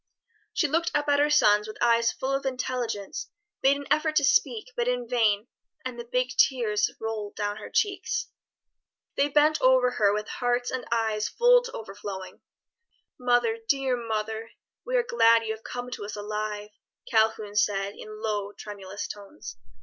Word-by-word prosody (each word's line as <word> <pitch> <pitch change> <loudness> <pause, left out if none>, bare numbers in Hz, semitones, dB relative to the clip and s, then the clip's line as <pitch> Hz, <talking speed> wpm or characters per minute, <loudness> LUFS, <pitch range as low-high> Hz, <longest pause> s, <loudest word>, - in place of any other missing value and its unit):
She 330 - +2
looked 330 +4 +1
up 290 0 +1
at 285 0 +4
her 295 +1 +4
sons 210 -8 +4
with 215 - -8
eyes 235 -1 +3
full 265 +1 -3
of 275 0 0
intelligence, 250 -6 -3 0.3
made 275 +1 +4
an 285 - -7
effort 310 +1 +2
to 290 - +4
speak, 255 -3 +2
but 240 0 0
in 245 -1 -1
vain; 220 -4 +2 0.4
and 250 -2 -5
the 235 0 -8
big 250 0 +1
tears 225 -6 +3
rolled 220 -2 -4
down 205 0 -2
her 215 - -8
cheeks. 430 +2 0 0.9
They 285 +1 +2
bent 300 +2 +3
over 255 -1 +5
her 210 -4 +3
with 210 +1 -2
hearts 245 0 -1
and 260 -1 -4
eyes 220 -2 0
full - - +5
to 480 - -6
overflowing. 195 -3 -7 0.8
"Mother, 245 -2 +2
dear 270 -2 +2
mother, 220 -1 -3 0.3
we - - -2
are 485 - +3
glad 230 - +4
you 220 -1 -2
have 220 0 -12
come 245 0 -6
to 225 - -5
us 205 - -6
alive," 210 0 -4 0.4
Calhoun 220 -2 +1
said 200 -1 +1
in 215 +1 -10
low, 205 -2 -2
tremulous 200 -2 -7
tones. 200 - -9
230 Hz, 170 wpm, -27 LUFS, 210-260 Hz, 0.9 s, over